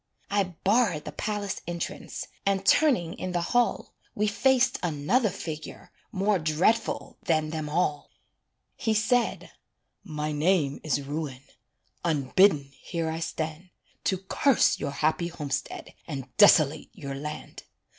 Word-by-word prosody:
I 195 -4 0
barred 200 -7 +2
the - - -5
palace 205 +4 -3
entrance, 170 -1 -5 0.2
And 195 -1 0
turning 190 - +4
in 185 -1 -3
the 175 - +1
hall 245 -1 +1 0.2
We 210 - +1
faced 255 +4 +3
another 175 - +1
figure 160 -4 -7 0.2
More 200 0 +1
dreadful 165 +9 0
than 155 -7 0
them 155 -2 -3
all; 150 -3 0 0.7
He 220 -3 0
said: 235 +3 +1 0.5
"My 150 -1 -3
name 150 -2 +1
is 145 -2 0
Ruin 140 -2 -5 0.6
Unbidden 150 -1 +3
here 165 -2 -2
I 160 - -3
stand, 160 +1 -4 0.4
To 190 - +2
curse 210 +8 +2
your 145 - -2
happy 155 +4 0
homestead 145 -4 -4
And 135 -5 -6
desolate 155 -8 +5
your 140 -7 -6
land. 150 +2 -7
170 Hz, 125 wpm, -27 LUFS, 150-205 Hz, 0.7 s, desolate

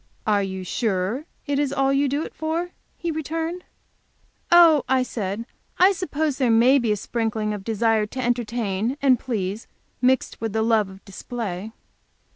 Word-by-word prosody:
"Are 210 -2 +3
you 190 -1 -4
sure 205 - -1 0.2
it 285 -2 0
is 285 -2 0
all 275 -1 +2
you 280 +1 +2
do 285 +4 -1
it - - -8
for?" 330 +3 -2 0.3
he 340 -1 -2
returned. 325 +3 -3 0.9
"Oh," 335 -5 +7
I 260 -1 +3
said, 215 -2 -4 0.3
"I 370 +2 +6
suppose 310 -6 -2
there 255 -3 +2
may 240 +5 +5
be 235 -3 0
a 210 - +1
sprinkling 220 -1 -2
of 205 -2 -6
desire 225 0 +1
to 260 - -7
entertain 235 -1 -1
and 265 -4 +4
please, 210 -4 -3 0.3
mixed 255 -2 +1
with 225 -2 -2
the 220 0 +1
love 220 -3 +2
of 190 0 -14
display." 205 -1 -5
240 Hz, 165 wpm, -23 LUFS, 210-280 Hz, 0.9 s, Oh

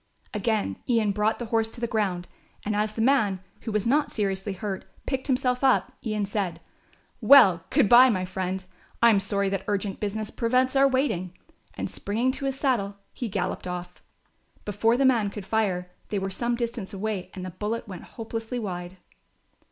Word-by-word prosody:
Again 210 - 0
Ian 225 -4 +3
brought 210 +2 +1
the 240 - -5
horse 225 0 +3
to 235 - -10
the 235 - 0
ground, 200 -6 -1 0.4
and 210 0 0
as 210 +1 0
the 225 - -1
man, 215 -8 +3 0.2
who 225 - -5
was 210 -1 0
not 285 +5 +2
seriously 195 -1 -1
hurt, 195 0 -4 0.2
picked 265 0 -2
himself 250 -1 +1
up, 265 -1 +3
Ian 215 -3 -1
said; 195 -4 -2 0.6
"Well, 200 -12 +7
good - - +4
bye, 250 +4 +8
my 185 -5 0
friend, 185 0 -3 0.4
I 235 - +8
am 205 - +4
sorry 200 0 0
that 195 -1 -2
urgent 200 -1 -1
business 215 +1 -3
prevents 255 +3 +1
our 275 0 +6
waiting," 185 -10 -1 0.4
and - - -3
springing 230 +6 -1
to 275 +1 -5
his 270 0 -2
saddle 205 -8 0 0.2
he 240 - -4
galloped 185 -1 -2
off. 180 0 -6 0.6
Before 225 +3 +2
the 270 - +3
man 235 -6 +3
could 200 -1 -8
fire 190 -4 0 0.2
they 210 - -1
were 195 0 -2
some 235 +5 -1
distance 235 -4 -4
away 200 -2 -3
and 185 -1 -6
the 185 - -6
bullet 210 +6 -3
went 185 -3 -7
hopelessly 225 +1 -5
wide. 180 -4 -5
210 Hz, 185 wpm, -26 LUFS, 195-235 Hz, 0.6 s, bye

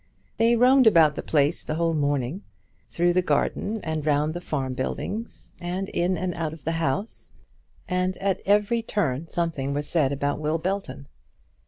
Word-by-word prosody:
They 230 +1 +4
roamed 255 +1 +5
about 165 -7 +6
the - - -5
place 150 +1 +1
the 155 - -3
whole 165 0 +1
morning, 145 +2 -1 0.5
through 175 +1 +2
the 185 - +3
garden 210 +4 0
and 155 -2 -2
round 150 +1 +1
the 175 - -5
farm 135 -6 -3
buildings, 210 - -4
and 180 +2 -3
in 180 +1 0
and 180 +2 -2
out 160 -2 -3
of 160 - -12
the 165 - -1
house; 160 +9 -2 0.5
and 185 0 -1
at 195 -2 -1
every 210 +3 +3
turn 165 - -1
something 155 -5 -2
was 145 0 -1
said 150 -6 +3
about 140 +1 -1
Will 155 +1 0
Belton. 185 -5 -4
165 Hz, 170 wpm, -25 LUFS, 145-190 Hz, 0.5 s, about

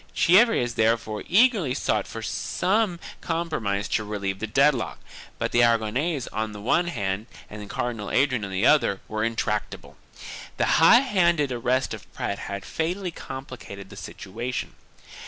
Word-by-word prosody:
Chievres 185 - +4
therefore 110 -1 0
eagerly 200 - +3
sought 110 -7 0
for 115 - -7
some 190 - 0 0.2
com 170 0 -2
promise 100 -6 -1
to 110 - 0
relieve 100 -2 -3
the 110 - -3
dead 135 +7 +4
lock, 120 -4 -4 0.4
but - - -2
the 120 - +4
Aragonese 120 +6 +1
on 110 0 -2
the 105 - -8
one 150 +11 +1
hand 100 - -3 0.2
and 105 -1 -8
Cardinal 115 -4 -3
Adrian 130 -4 +2
on 100 - -4
the 95 +4 0
other 140 -10 +3
were 110 0 -2
intractable. 110 -2 -3 0.6
The - - +2 0.2
high 235 +9 +8
handed 170 - +2
arrest 125 +2 0
of - - -10
Prat 100 - -3
had 100 -1 -6
fatally 180 +3 -2
complicated 130 -10 -9
the - - -10
situation. 120 +6 -5
120 Hz, 155 wpm, -25 LUFS, 105-165 Hz, 0.6 s, high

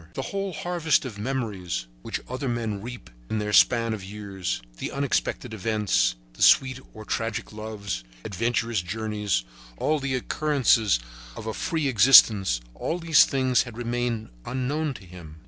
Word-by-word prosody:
The - - -2
whole 195 +3 -3
harvest 160 -2 0
of 110 -5 -7
memories 105 - -3 0.2
which - - -4
other 130 +1 -3
men 115 -4 -2
reap 120 - -9 0.2
in 110 - -1
their 105 0 -2
span 115 0 +5
of 105 -3 -6
years, 95 -4 -4 0.2
the - - -4
unexpected 135 -3 -1
events, 105 - +1 0.2
sweet 130 -1 +5 0.2
or 110 0 -9
tragic 115 -2 -3
loves, 105 - -5 0.2
adventurous 115 +1 0
journeys, 105 - -2 0.3
all 155 - +1
the 135 -1 -1
occurrences 125 - +2 0.4
of 110 - -8
a 110 - -3
free 160 - -1
existence, 105 - +6
all 165 - -3
these 165 -3 +5
things 130 -2 +2
had 120 -2 -7
remained 120 - -2
unknown 140 - -2
to 95 - -11
him. 85 -4 -12
115 Hz, 145 wpm, -25 LUFS, 100-130 Hz, 0.4 s, existence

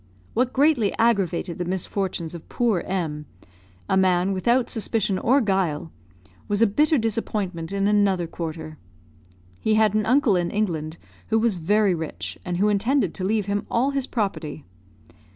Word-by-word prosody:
What 250 +2 +1
greatly 270 -7 +3
aggravated 195 -7 +1
the - - 0
misfortunes 185 -2 -2
of 170 - -10
poor 230 -6 +1
M, 155 -6 -3 0.6
a - - +1
man 185 0 +3
without 235 +6 +2
suspicion 215 -4 0
or 270 +4 +3
guile, 180 -7 -1 0.6
was 205 0 0
a - - +7
bitter 295 +9 +2
disappointment 205 -7 -2
in 200 0 0
another 200 -4 +2
quarter. 160 -2 -6 0.8
He 220 - +1
had 215 -2 +3
an 215 0 0
uncle 250 -4 +4
in 175 -1 0
England, 165 -6 -2 0.3
who 220 - +2
was 220 -5 +1
very 205 +3 +2
rich, 160 -2 -4
and 180 -1 -3
who 200 +3 +2
intended 210 - +1
to 185 - -5
leave 210 +1 0
him 200 0 -2
all 255 +4 +1
his 275 -2 -2
property. 195 - -3
200 Hz, 155 wpm, -24 LUFS, 175-225 Hz, 0.8 s, a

